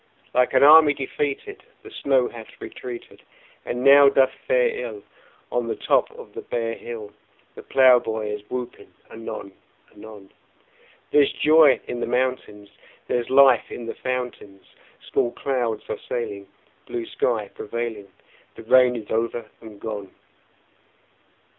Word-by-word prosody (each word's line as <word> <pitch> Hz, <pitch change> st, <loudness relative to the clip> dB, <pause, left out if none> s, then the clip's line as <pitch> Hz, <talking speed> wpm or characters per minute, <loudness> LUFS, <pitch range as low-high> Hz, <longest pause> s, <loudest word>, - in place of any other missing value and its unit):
Like 125 Hz, +1 st, +2 dB
an 130 Hz, -, +5 dB
army 150 Hz, 0 st, +8 dB
defeated 145 Hz, -, -4 dB, 0.2 s
The 420 Hz, -, -12 dB
snow 135 Hz, -, +1 dB
hath 115 Hz, -2 st, -12 dB
retreated, 125 Hz, -2 st, -9 dB, 0.4 s
And 125 Hz, +1 st, -4 dB
now 140 Hz, +1 st, +8 dB
doth 135 Hz, -1 st, +3 dB, 0.2 s
fare -, -, +3 dB
ill 445 Hz, -3 st, -6 dB, 0.5 s
On -, -, -1 dB
the -, -, -2 dB
top 405 Hz, -, +1 dB
of 475 Hz, -, -12 dB
the 440 Hz, -, -7 dB
bare 115 Hz, -, -3 dB
hill; 110 Hz, -3 st, -8 dB, 0.4 s
The -, -, -11 dB
plowboy 120 Hz, -5 st, +3 dB
is 105 Hz, -, -6 dB
whooping 125 Hz, -1 st, -7 dB, 0.2 s
anon 115 Hz, -3 st, -8 dB, 0.4 s
anon: 105 Hz, -2 st, -13 dB, 0.8 s
There's 145 Hz, -2 st, +4 dB
joy 155 Hz, -3 st, +5 dB
in 120 Hz, -, -4 dB
the -, -, -3 dB
mountains; 125 Hz, -5 st, -2 dB, 0.4 s
There's 120 Hz, -1 st, -1 dB
life 135 Hz, -3 st, +5 dB
in 120 Hz, -, -7 dB
the 115 Hz, -, -5 dB
fountains; 125 Hz, -6 st, -5 dB, 0.4 s
Small 120 Hz, -, 0 dB
clouds 120 Hz, -6 st, -2 dB
are -, -, -5 dB
sailing, 105 Hz, -5 st, -4 dB, 0.4 s
Blue 120 Hz, -1 st, -4 dB
sky 110 Hz, -5 st, -2 dB
prevailing; 115 Hz, -2 st, -6 dB, 0.5 s
The -, -, -11 dB
rain 125 Hz, +1 st, +4 dB
is 110 Hz, -3 st, -8 dB
over 115 Hz, 0 st, -2 dB
and 110 Hz, -3 st, -12 dB
gone! 105 Hz, -3 st, -6 dB
120 Hz, 135 wpm, -23 LUFS, 110-135 Hz, 0.8 s, army